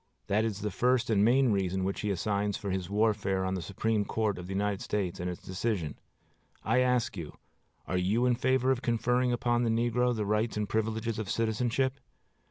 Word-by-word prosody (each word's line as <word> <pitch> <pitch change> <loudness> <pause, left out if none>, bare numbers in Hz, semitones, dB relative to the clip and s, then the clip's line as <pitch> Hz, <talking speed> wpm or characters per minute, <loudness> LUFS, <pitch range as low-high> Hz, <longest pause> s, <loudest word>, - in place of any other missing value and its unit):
That 105 +2 +1
is 105 -2 -3
the 105 0 -2
first 125 +3 +1
and 100 -2 +4
main 125 +2 +4
reason 95 -2 0
which 95 +1 -2
he 105 - -1
assigns 100 +1 0
for 100 - -4
his 95 -1 -2
warfare 100 -2 +1
on 95 - -1
the 95 - -2
Supreme 105 +5 0
Court 105 -2 -1
of 90 - -7
the 95 - -4
United 100 0 -1
States 100 -4 -2
and 90 +1 -2
its 90 - -7
decision. 95 -5 -2 0.7
I 115 +4 +2
ask 125 -3 +1
you, 85 -5 -7 0.5
Are 90 - -1
you 105 +7 +2
in 125 - +4
favor 130 +1 +2
of 130 -2 0
conferring 125 +1 +1
upon 120 0 +1
the 120 - +1
negro 120 +2 +1
the 105 -2 -2
rights 105 +2 0
and 105 -1 -1
privileges 110 +1 -1
of 105 -4 -4
citizenship? 120 +5 0
110 Hz, 200 wpm, -30 LUFS, 100-120 Hz, 0.7 s, and